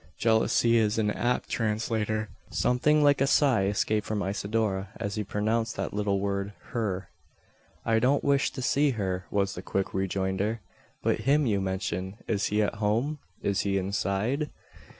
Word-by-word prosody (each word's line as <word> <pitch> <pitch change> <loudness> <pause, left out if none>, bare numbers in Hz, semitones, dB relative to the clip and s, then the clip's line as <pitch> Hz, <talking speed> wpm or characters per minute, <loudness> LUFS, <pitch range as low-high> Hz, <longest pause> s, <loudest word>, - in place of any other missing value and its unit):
Jealousy 115 +1 +3
is 110 -1 +2
an 105 -2 +2
apt 120 +3 0
translator. 110 -1 -1 0.2
Something 150 +5 +2
like 145 -2 +4
a 135 - +4
sigh 135 -9 +4
escaped 105 +1 0
from 105 -2 -1
Isidora, 100 0 -1
as 100 - -3
he 105 - -2
pronounced 110 +3 -1
that 95 - -3
little 100 -1 0
word 100 0 -2 0.2
"her." 95 -6 -2 0.8
"I 115 0 +3
don't 130 +5 +2
wish 140 -1 +3
to 130 - -5
see 145 +3 +3
her," 95 -2 -2
was 100 -1 0
the 90 - -6
quick 95 0 -2
rejoinder; 95 +3 -1 0.4
"but - - +1
him 150 +1 +4
you 100 -5 +1
mention. 95 0 -3
Is 105 -3 +1
he 105 +1 +2
at 105 - -2
home? 120 +9 +1 0.2
Is 100 0 +1
he 100 -1 +1
inside?" 100 - -1
105 Hz, 160 wpm, -28 LUFS, 100-115 Hz, 0.8 s, like